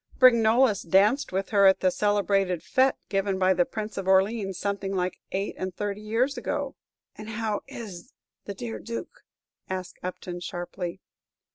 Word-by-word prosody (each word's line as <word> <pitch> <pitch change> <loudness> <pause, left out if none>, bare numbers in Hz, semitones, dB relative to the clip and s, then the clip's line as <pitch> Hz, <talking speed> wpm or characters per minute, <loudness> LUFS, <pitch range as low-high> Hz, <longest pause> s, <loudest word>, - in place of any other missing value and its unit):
"Brignolles 235 -2 +5
danced 205 - +3
with 190 +1 -2
her 200 -2 +5
at 190 - +5
that 185 -1 +3
celebrated 200 -4 +1
fête 260 0 +3
given 195 -1 0
by 190 0 +4
the 175 -1 +2
Prince 215 -2 -5
of 190 - -5
Orleans 195 0 +2
something 195 0 -2
like 180 -1 -1
eight 195 +2 -2
and 185 -1 -4
thirty 205 0 -3
years 235 +6 0
ago." 285 -2 -3 0.4
"And 215 0 -9
how 220 -1 -2
is 195 -7 -9 0.3
the 200 - -5
dear 230 +3 -5
Duke?" 230 0 -7 0.5
asked 185 -1 -5
Upton, 180 -1 -5
sharply. 175 +1 -5
200 Hz, 155 wpm, -27 LUFS, 185-220 Hz, 0.5 s, Brignolles